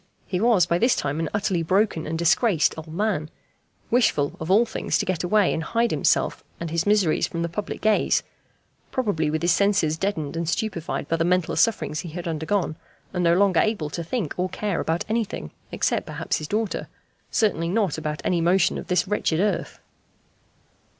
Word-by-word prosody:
He 180 - -2
was 220 -5 +4
by 170 0 +1
this 240 +4 +3
time 145 +2 -2
an 165 -2 -1
utterly 195 -4 0
broken 185 -1 +1
and 160 +1 -2
disgraced 170 +1 +3
old 160 0 -9
man; 180 -4 -1 0.6
wishful, 185 - +2
of 160 - -5
all 210 +5 +5
things, 225 - -1
to - - -1
get 185 -2 -1
away 200 +2 +3
and 160 - -2
hide 230 +9 0
himself - - +1 0.2
and 170 -2 -4
his 170 +3 0
miseries 205 -6 +3
from 170 -1 -3
the - - 0
public 185 +5 -5
gaze; 215 -1 +2 0.7
probably 205 - 0
with 155 +1 -2
his 175 - +4
senses 190 -5 +2
deadened 180 -7 -2
and 165 -1 -2
stupefied 185 -5 -2
by 165 - 0
the 165 - +1
mental 180 0 +1
sufferings 190 -9 +1
he 175 -1 -5
had 170 +2 -6
undergone, 160 +1 -1 0.4
and 180 -1 0
no 170 0 +4
longer 190 -2 +3
able 200 -9 0
to 170 - -4
think 190 - -2
or 180 +1 0
care 195 -1 -2
about 165 +2 -1
anything 220 - -2 0.2
except - - 0
perhaps - - -2
his 155 - -5
daughter, 215 +2 -2 0.4
certainly 170 -7 +1
not 195 -5 0
about 150 -1 -4
any 175 -2 +1
motion 175 +2 +2
of - - -9
this 180 +1 +1
wretched 185 -5 0
earth. 205 +2 -1
175 Hz, 190 wpm, -24 LUFS, 160-205 Hz, 0.7 s, all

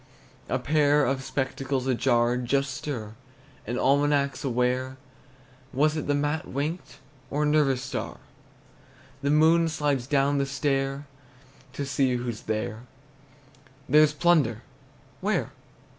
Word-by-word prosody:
A 130 - +1
pair 145 +2 +3
of 135 +1 -1
spectacles 135 -1 -2
ajar 120 -2 +2
just 135 +2 0
stir 120 -5 -5 0.5
An 120 +2 -2
almanac's 140 +1 +2
aware. 130 0 0 0.8
Was 150 +3 +2
it 155 - -3
the 145 - +2
mat 145 +2 -1
winked, 150 +6 -4 0.3
Or 150 +2 0
a - - +2
nervous 145 -4 +2
star? 130 0 -5 1.0
The 140 - 0
moon 160 +2 +4
slides 145 -5 -1
down 140 0 +2
the 140 - 0
stair 135 +1 -1 0.7
To 140 +1 -4
see 135 -2 +1
who's 120 -2 -4
there. 110 0 -2 1.1
There's 150 +2 +5
plunder, 150 -9 +2 0.6
where? - - -1
135 Hz, 120 wpm, -26 LUFS, 125-145 Hz, 1.1 s, There's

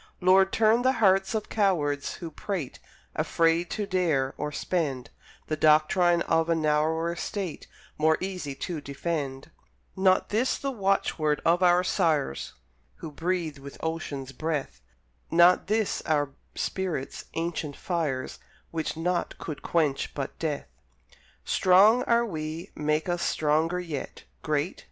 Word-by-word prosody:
Lord, 190 +1 +5
turn 225 +2 +4
the 260 +1 +3
hearts 195 -3 +3
of 215 - -2
cowards 155 -9 0
who 170 -2 -7
prate, 165 -3 -4 0.4
Afraid 165 +1 +1
to 210 - -2
dare 165 -9 +1
or 150 0 -3
spend, 145 -6 -2 0.3
The 155 - -2
doctrine 155 +3 +4
of 165 0 +1
a 165 - +3
narrower 160 +2 +1
state 190 -2 -5 0.3
More 155 +1 +4
easy 180 -7 -4
to 160 +2 -4
defend; 140 -2 -4 0.4
Not 190 -1 +3
this 230 +5 +1
the 275 - -3
watchword 190 - 0
of 170 +2 +3
our 180 0 +5
sires, 150 - 0 0.4
Who 160 - -8
breathed 165 -2 -2
with 140 0 -10
ocean's 150 -5 -4
breath, 150 +1 -3 0.5
Not 175 +2 +5
this 215 0 0
our 145 -3 +1 0.2
spirit's 175 -8 -3
ancient 165 -3 -3
fires, 155 -8 -3 0.3
Which 160 -1 -3
naught 175 +1 -1
could 155 -3 -6
quench 155 -5 0
but 135 -2 -5
death. 150 -3 -2 0.8
Strong 200 +6 +5
are 235 0 +3
we? 160 -3 -5
Make 150 +2 -1
us 175 -1 -1
stronger 155 +3 +1
yet; 165 -6 -6 0.2
Great? 155 +2 -1
165 Hz, 130 wpm, -27 LUFS, 150-185 Hz, 0.8 s, Lord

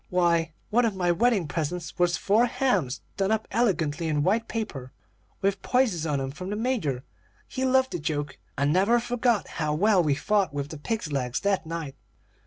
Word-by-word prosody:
Why, 170 -3 +2 0.2
one 240 +3 +4
of 220 -4 0
my 180 -2 +1
wedding 205 -2 +2
presents 165 +4 -4
was 175 0 +3
four 220 +5 +3
hams 205 - 0 0.2
done 195 0 +1
up 220 0 0
elegantly 170 -8 +1
in 150 -2 +1
white 220 +7 +1
paper, 140 - -5 0.5
with 195 0 0
posies 220 -11 +1
on 145 -2 0
'em, 135 0 -3
from 180 +6 -7
the 205 - -2
Major. 210 - -1 0.4
He 260 -1 -2
loved 260 0 +3
a 175 - -2
joke, 145 -2 -3 0.2
and 140 +1 +2
never 200 +7 +4
forgot 240 -2 0
how 150 -1 +1
well 200 +3 +4
we 150 -4 +2
fought 190 0 +1
with 140 0 -3
the 155 - -8
pigs' 210 -2 -3
legs 125 -3 -1
that 195 -4 0
night. 160 -4 -5
180 Hz, 190 wpm, -26 LUFS, 150-220 Hz, 0.5 s, one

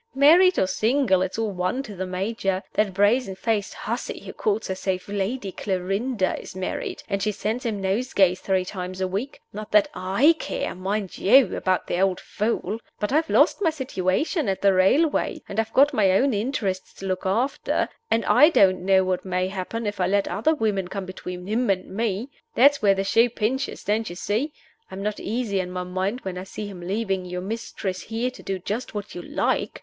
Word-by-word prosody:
"Married 340 +7 +6
or - - +3
single, 215 +1 +2
it's 190 +2 -2
all 225 -2 -1
one 185 +8 -1
to 210 -6 -9
the 185 0 -4
Major. 195 +1 -2
That 210 -2 +1
brazen 205 +2 +2
faced 210 0 -1
hussy - - -4
who - - -9
calls 210 +1 -1
herself 190 -1 -2
Lady 200 +1 -2
Clarinda 195 +3 -1
is - - -11
married, 185 0 -4
and 200 -2 -2
she 210 +2 +1
sends 225 +5 -3
him 210 -3 -2
nosegays 195 -2 +2
three 190 -1 0
times 185 -1 -6
a 190 - 0
week! 205 +9 -4
Not 210 +1 -7
that 210 -1 +5
I 195 - +3
care, - - -3
mind 195 +1 -3
you, 245 0 +5
about 185 -1 0
the 175 - -1
old 190 -2 +2
fool. 215 0 -2 0.2
But 210 - -1
I've 315 +2 +2
lost - - +4
my 345 - +4
situation 265 - -1
at 190 - -2
the 200 -1 +5
railway, 270 - +2
and 200 - -3
I've 225 0 -1
got 285 +4 +5
my 200 -6 +4
own 260 +7 +3
interests 205 -4 -2
to 195 - -8
look 185 0 -2
after, 235 +9 0 0.2
and 230 - +1
I 300 - +7
don't 190 - +4
know 190 0 +4
what 185 -1 -1
may 185 0 -1
happen 200 +4 -4
if 205 -1 -3
I 180 - +3
let 200 +1 +1
other 315 +10 +1
women 205 -8 0
come 195 0 -5
between 180 -1 -7
him 225 +4 0
and 190 0 -1
me. 225 +3 -2 0.2
That's 280 +3 +5
where 200 -2 +4
the 195 - -1
shoe 230 +4 +4
pinches, 245 +5 -2
don't 220 +2 0
you 175 - -7
see? 220 - -1 0.4
I'm 195 +1 -6
not 210 0 -2
easy 215 -3 -1
in 180 -1 -2
my 180 0 -4
mind 190 +6 -2
when 185 -4 -5
I - - -6
see 210 +2 -7
him 195 -3 -8
leaving 195 +1 -1
you 180 0 -5
mistress 190 -2 -4
here 230 +3 -2
to - - -13
do 195 - -3
just 210 +6 -4
what 205 0 -5
you 175 - -6
like. - - -1
200 Hz, 205 wpm, -24 LUFS, 185-230 Hz, 0.4 s, I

